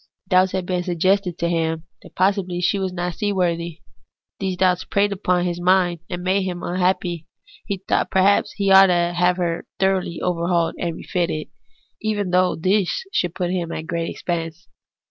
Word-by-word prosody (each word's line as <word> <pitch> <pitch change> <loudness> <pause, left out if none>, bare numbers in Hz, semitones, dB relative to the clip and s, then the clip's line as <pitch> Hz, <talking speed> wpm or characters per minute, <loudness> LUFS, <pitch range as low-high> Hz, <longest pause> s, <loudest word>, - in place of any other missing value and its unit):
Doubts 185 0 +4
had 185 -1 -1
been 180 -1 -1
suggested 180 +1 +1
to 170 - 0
him 165 -1 -1 0.2
that - - -16
possibly 185 -2 +1
she 195 +3 +1
was 190 -1 -2
not 175 -1 -3
seaworthy. 170 -4 -1 0.6
These 190 -2 -2
doubts 185 -1 +2
preyed 205 0 +1
upon 180 -2 0
his 175 0 -2
mind, 180 -1 +3
and 175 -1 -4
made 190 +2 +2
him 180 -2 -4
unhappy; 180 -2 -1 0.4
he 200 -2 -2
thought 190 - -28
that - - +1
perhaps 195 +2 +3
he 200 -1 0
ought 195 0 +9
to 175 -1 +1
have 180 +1 +2
her 170 -2 -2
thoroughly 190 -3 0
overhauled 170 -1 0
and 170 -2 -2
refitted, 170 -4 -2 0.5
even 205 -4 -1
though 180 0 +3
this 190 - +1
should 175 -1 0
put 180 -2 -1
him 175 -2 -2
to 160 - -4
great 165 +1 -3
expense. 170 0 -4
180 Hz, 175 wpm, -22 LUFS, 170-190 Hz, 0.6 s, ought